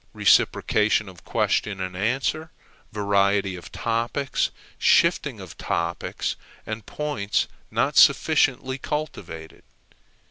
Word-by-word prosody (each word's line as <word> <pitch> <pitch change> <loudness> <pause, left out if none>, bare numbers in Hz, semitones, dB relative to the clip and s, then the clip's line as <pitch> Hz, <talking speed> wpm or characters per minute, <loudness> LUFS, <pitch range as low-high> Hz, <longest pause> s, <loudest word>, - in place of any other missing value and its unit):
Reciprocation 105 0 +3
of 90 -2 -13
question 105 -3 0
and 95 -1 -4
answer, 135 - -1 0.4
variety 100 -1 +1
of 90 - -11
topics, 120 +4 -1 0.3
shifting - - +3
of - - -10
topics, 85 0 -2 0.3
are 110 - -3
points 115 -2 -2 0.2
not - - 0
sufficiently 130 +1 +4
cultivated. 85 - -6
105 Hz, 95 wpm, -24 LUFS, 95-130 Hz, 0.4 s, sufficiently